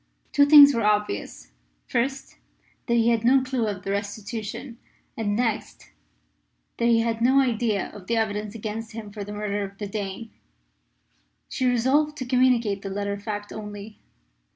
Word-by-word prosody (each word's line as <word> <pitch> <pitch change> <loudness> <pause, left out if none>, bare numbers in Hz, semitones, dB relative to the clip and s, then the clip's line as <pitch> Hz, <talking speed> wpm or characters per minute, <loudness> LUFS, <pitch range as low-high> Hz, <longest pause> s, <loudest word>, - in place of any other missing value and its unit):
Two 285 0 +4
things 285 -1 +9
were 230 - 0
obvious: 210 - -1 0.3
first, 270 +3 -2 0.5
that 235 - +2
he 230 0 +3
had 230 -1 +1
no 260 +2 +4
clue 255 -4 -1
of 195 -3 -4
the 195 - -3
restitution; 215 +4 -5 0.4
and, 205 -2 -1
next, 225 -2 -3 0.9
that 235 - +1
he 230 -1 +4
had 230 0 -2
no 260 +3 +4
idea 230 -6 0
of 190 -3 -12
the 230 - 0
evidence 210 -1 -2
against 225 +1 -6
him 215 -2 -8
for 205 -1 -6
the 205 - -8
murder 205 -1 -3
of 195 0 -8
the 205 - -5
Dane. 205 +2 -5 1.2
She 255 - -1
resolved 270 +5 +2
to 260 - -4
communicate 245 -5 +2
the 195 - -5
latter 200 +1 -3
fact 205 0 -5
only. 210 0 -8
220 Hz, 160 wpm, -25 LUFS, 205-245 Hz, 1.2 s, things